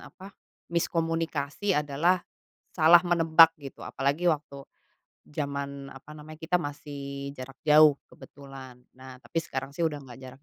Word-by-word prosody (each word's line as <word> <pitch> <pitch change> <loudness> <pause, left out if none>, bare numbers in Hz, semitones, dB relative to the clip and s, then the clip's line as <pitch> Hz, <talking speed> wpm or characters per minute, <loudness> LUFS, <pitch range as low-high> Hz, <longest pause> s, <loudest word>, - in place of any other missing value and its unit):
apa 195 +1 -13 0.4
miskomunikasi 165 +1 -1
adalah 150 +5 +1 0.5
salah 165 +1 +6
menebak 165 -2 +6
gitu. 140 -2 -11
Apalagi 145 +6 0
waktu 140 -2 -5 0.7
zaman 140 -1 -4
apa 135 +3 -14
namanya 155 +1 -11
kita 180 +2 +1
masih 140 -2 -7
jarak 135 0 -10
jauh 150 -1 +6 0.2
kebetulan. 135 -2 -13 0.2
Nah, 130 0 -11
tapi 165 - -3
sekarang 135 -3 -5
sih 165 +3 0
udah 150 -3 -4
nggak 125 -2 -12
jarak 130 +1 -12
145 Hz, 130 wpm, -27 LUFS, 140-165 Hz, 0.7 s, salah